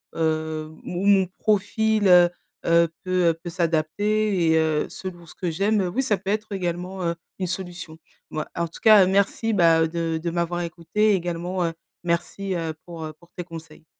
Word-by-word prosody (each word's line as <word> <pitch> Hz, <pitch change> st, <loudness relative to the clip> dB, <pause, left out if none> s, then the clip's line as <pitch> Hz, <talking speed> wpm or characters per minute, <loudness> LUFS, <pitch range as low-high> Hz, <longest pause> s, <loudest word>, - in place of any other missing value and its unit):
heu, 155 Hz, -1 st, -1 dB
mon 180 Hz, +2 st, -3 dB
mon 195 Hz, -2 st, +5 dB
profil, 215 Hz, 0 st, +2 dB
heu 180 Hz, -1 st, +7 dB, 0.4 s
heu, 170 Hz, 0 st, +5 dB
peut 180 Hz, -2 st, +2 dB
peut 175 Hz, -, -4 dB
s'adapter 175 Hz, +3 st, +1 dB
et 160 Hz, -, +4 dB
heu, 160 Hz, -1 st, +1 dB
selon 175 Hz, -2 st, -8 dB
ce 165 Hz, -, -14 dB
que 180 Hz, -3 st, -2 dB
j'aime, 200 Hz, +5 st, +1 dB
oui, 265 Hz, -, +3 dB
ça 215 Hz, -6 st, +1 dB
peut 190 Hz, -, -6 dB
être 215 Hz, +1 st, -2 dB
également, 180 Hz, 0 st, -3 dB
heu, 170 Hz, 0 st, 0 dB, 0.2 s
une 185 Hz, -, -1 dB
solution. 175 Hz, -3 st, -6 dB, 0.3 s
Bah, 155 Hz, 0 st, -3 dB
en 170 Hz, 0 st, -1 dB
tout 165 Hz, -, -13 dB
cas, 215 Hz, -4 st, +8 dB
merci, 200 Hz, +4 st, +1 dB
bah, 165 Hz, -4 st, +4 dB
de 165 Hz, -1 st, -2 dB
de 170 Hz, -, -2 dB
m'avoir 175 Hz, 0 st, -1 dB
écoutée 175 Hz, +6 st, 0 dB
et -, -, +4 dB
également, 175 Hz, +1 st, -2 dB
heu, 165 Hz, -, -2 dB, 0.3 s
merci, 175 Hz, +3 st, -2 dB
heu, 165 Hz, -2 st, -2 dB
pour 165 Hz, -3 st, -7 dB
pour 170 Hz, 0 st, -21 dB
tes 180 Hz, -, -4 dB
conseils. 165 Hz, -2 st, -11 dB
175 Hz, 180 wpm, -24 LUFS, 165-195 Hz, 0.4 s, cas